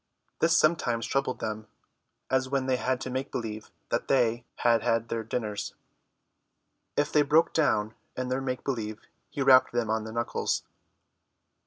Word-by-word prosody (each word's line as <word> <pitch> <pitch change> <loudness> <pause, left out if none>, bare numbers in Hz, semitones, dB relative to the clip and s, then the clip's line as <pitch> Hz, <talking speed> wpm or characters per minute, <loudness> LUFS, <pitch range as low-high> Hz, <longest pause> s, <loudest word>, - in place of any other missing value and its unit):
This 165 0 +4
sometimes 125 -8 +2
troubled 135 -2 -1
them, 110 0 -4 0.6
as 130 0 +2
when 135 -1 0
they 130 -1 +1
had 125 +2 0
to 130 - -4
make 130 +2 -3
believe 110 -2 -5 0.2
that - - -1
they 120 -3 +2
had 115 -2 +3
had 115 0 0
their 115 -1 -2
dinners. 110 -2 -3 1.2
If 145 0 +1
they 150 - +5
broke 150 +3 +3
down 110 -9 +2 0.2
in 130 0 -2
their 130 +1 0
make 130 -1 -3
believe 110 -6 -3 0.3
he 140 - -2
rapped 130 -2 +6
them 120 -2 0
on 110 0 0
the 110 - -7
knuckles. 120 +1 -1
125 Hz, 160 wpm, -28 LUFS, 115-135 Hz, 1.2 s, rapped